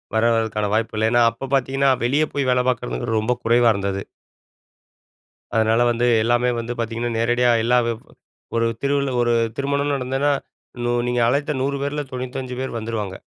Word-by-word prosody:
வர 110 - +2
வரதுக்கான 110 -2 -1
வாய்ப்பு 110 0 0
இல்ல. 110 +1 +2
ஏன்னா, 120 -1 +4
அப்போ 125 +4 -7
பார்த்தீங்கன்னா 135 +1 +1 0.2
வெளியே 145 +5 +2
போய் 140 -2 0
வேல 125 0 +3
பார்க்கறது 120 -2 -2
ரொம்ப 110 +3 0
குறைவா 120 0 +4
இருந்தது. 100 0 -2 1.5
அதனால 110 +1 +3
வந்து 120 +1 0 0.2
எல்லாமே 120 +1 +2
வந்து 115 +1 -4
பார்த்தீங்கன்னா, 115 +1 -2
நேரடியா 120 +2 +2
எல்லா 125 +1 +3 0.8
ஒரு 115 0 +2 0.2
திருவி 140 -1 0
ஒரு 120 0 +2 0.2
திருமணம் 140 +1 0
நடந்ததுனா, 135 +2 0 0.8
நீங்க 125 0 0
அழைத்த 145 +4 0
100 140 +1 -1
பேரில 145 +1 -2
95 125 0 -5
பேர் 130 -3 -4
வந்துருவாங்க. 110 -4 -4
120 Hz, 150 wpm, -21 LUFS, 115-135 Hz, 1.5 s, ஏன்னா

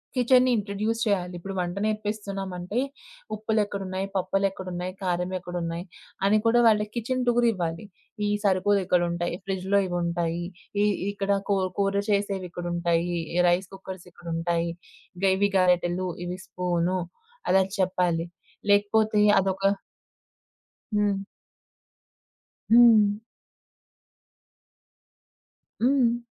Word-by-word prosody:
కిచెన్ని 255 0 +4
introduce 210 +2 -2
చేయాలి. 185 -4 0
ఇప్పుడు 195 +3 -6
వంట 175 0 -2
నేర్పిస్తున్నామంటే 205 -2 -3 0.6
ఉప్పులేక్కడున్నాయి, 200 -3 -1
పప్పులేక్కడున్నాయి, 185 -1 -2
కారం 180 0 -1
ఎక్కడున్నాయి, 175 -1 -4 0.4
అని 210 +2 +4
కూడా 235 +1 +5
వాళ్ళకి 210 -1 +3
కిచెన్ 250 +2 -1
టూరివ్వాలి. 215 -8 +1 0.4
ఈ - - +1
సరుకులిక్కడుటాయి, 180 -3 +1
ఫ్రిడ్జ్‌లో 195 +1 +1
ఇవుంటాయి, 170 -1 -1 0.4
ఈ - - +4 0.3
ఇక్కడ 200 0 -2 0.2
కూర 195 -2 +2
కూర 200 0 +1
చేసేవిక్కడుంటాయి, 175 -3 -1 0.3
రైస్ 180 +2 +1
కుక్కర్స్ 190 -2 -9
ఇక్కడుంటాయి, 170 0 -2 0.5
ఇగ 195 - -1
ఇవి 200 +1 +2
గరేటలు, 180 0 +2 0.2
ఇవి 180 +1 -5
స్పూన్, 180 0 -1 0.5
అలా 190 +1 +5 0.2
చెప్పాలి. 180 -3 +1 0.4
లేకపోతే 210 +1 +3 0.2
అదొక 190 0 -1 1.3
హ్మ్. 205 -1 +2 1.5
హ్మ్. 225 -3 +7 2.7
హ్మ్. 245 -2 +3
190 Hz, 90 wpm, -26 LUFS, 175-210 Hz, 2.7 s, హ్మ్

